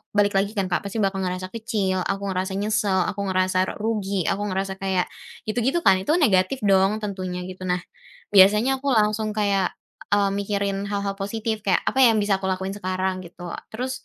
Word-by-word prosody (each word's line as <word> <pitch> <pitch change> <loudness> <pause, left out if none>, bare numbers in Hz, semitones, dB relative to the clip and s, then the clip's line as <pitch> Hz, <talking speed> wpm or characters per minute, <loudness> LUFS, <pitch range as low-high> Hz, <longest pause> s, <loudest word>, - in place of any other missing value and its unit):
balik 205 0 +4
lagi 200 +1 +1
kan, 190 -2 -1
Kak. 175 - +2
pasti 200 - -5
bakal 195 0 0
ngerasa 185 0 -3
kecil, 210 -5 -1
aku 195 +2 -2
ngerasa 185 +1 -2
nyesel, 205 -2 +1
aku 200 - -9
ngerasa 185 0 +1
rugi, 200 -4 -1
aku 200 - -2
ngerasa 195 0 -3
kayak 190 -2 +1 0.4
gitu 215 +3 -2
gitu 340 +5 +1
kan. 185 - +5
Itu 300 - +1
kan 355 - +1
negatif 195 +3 +2
dong 200 +2 +3
tentunya 185 -3 -4
gitu. 185 0 -7
Nah, 180 0 0 0.5
biasanya 210 +6 +7
aku 280 - +1
langsung 215 -1 +2
kayak 200 -3 +1 0.4
e 205 - +3
mikirin 200 0 -2
hal-hal 200 -1 -3
positif, 220 +2 -2
kayak 195 -3 +1
apa 265 - 0
ya, 235 -4 +6
yang - - +2
bisa 195 -2 +1
aku 190 - -3
lakuin 190 0 -2
sekarang? 185 -1 -2
Gitu. 175 +1 -12 0.3
Terus, 250 +4 -3
195 Hz, 190 wpm, -24 LUFS, 185-210 Hz, 0.5 s, biasanya